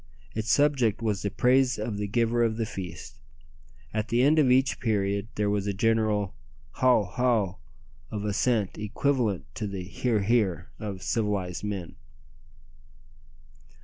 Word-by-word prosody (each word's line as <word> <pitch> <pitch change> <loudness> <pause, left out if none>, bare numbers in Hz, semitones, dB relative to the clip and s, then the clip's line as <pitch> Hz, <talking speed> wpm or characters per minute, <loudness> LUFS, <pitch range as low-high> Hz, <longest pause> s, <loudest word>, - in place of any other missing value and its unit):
Its 110 0 -3
subject 135 -7 +3
was 105 -4 0
the 100 - -1
praise 125 +4 +3
of 105 0 -3
the 105 - -2
giver 115 +2 +1
of 110 -1 0
the 115 - 0
feast. 90 - -8 0.7
At 110 0 -1
the 120 +2 +2
end 155 +3 +5
of 140 -4 +4
each 130 +2 +3
period 100 -2 0
there 105 -1 0
was 100 -1 0
a 100 - -1
general 110 -2 +1 0.4
"hou! 125 -4 +4
hou!" 105 -2 0 0.5
of 105 -1 -4
assent 105 -1 0
equivalent 105 - 0
to 105 - -4
the 100 -2 -5
"hear! 105 +4 -1
hear!" 100 -5 +1
of 100 -3 -5
civilized 100 -6 -1
men. 100 -8 -5
105 Hz, 145 wpm, -27 LUFS, 100-120 Hz, 0.7 s, end